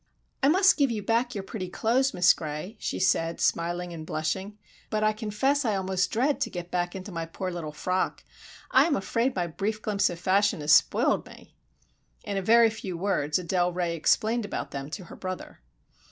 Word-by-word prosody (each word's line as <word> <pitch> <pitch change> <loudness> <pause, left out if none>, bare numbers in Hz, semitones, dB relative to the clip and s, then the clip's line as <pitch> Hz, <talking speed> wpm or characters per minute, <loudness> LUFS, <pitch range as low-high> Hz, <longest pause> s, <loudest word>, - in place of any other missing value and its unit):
"I 275 - +4
must 375 +6 +5
give 280 -3 +3
you 215 -3 -3
back 235 +3 0
your 200 - -3
pretty 190 -2 -6
clothes, 255 +8 +1
Miss 180 0 +5
Gray," 155 +7 -6
she - - -3
said, 165 -2 +1
smiling 175 +1 0
and 160 -2 -7
blushing, 190 +7 -3 0.3
"but 215 -1 -1
I 215 0 +3
confess 225 +7 0
I 220 -4 +1
almost 190 -1 0
dread 270 +6 0
to - - 0
get 175 0 -7
back 175 +1 -1
into 190 +2 -7
my 165 -2 -4
poor 185 +2 -4
little 170 -3 -5
frock! 180 +5 -2 0.5
I - - +6
am 310 - +1
afraid 230 +7 0
my 180 -2 0
brief 200 +6 -3
glimpse 210 -2 +1
of 175 - -5
fashion 200 +1 +2
has 150 +1 +1
spoiled - - +4
me." - - -15 0.7
In 205 -3 -4
a 195 - 0
very 230 +3 +5
few 195 -5 -6
words 165 -6 0
Adele 180 0 0
Ray 175 -1 -1
explained 220 +8 +2
about 205 - -5
them 140 0 -5
to 185 +5 -6
her 170 - -11
brother. 185 -1 -7
190 Hz, 195 wpm, -27 LUFS, 175-220 Hz, 0.7 s, I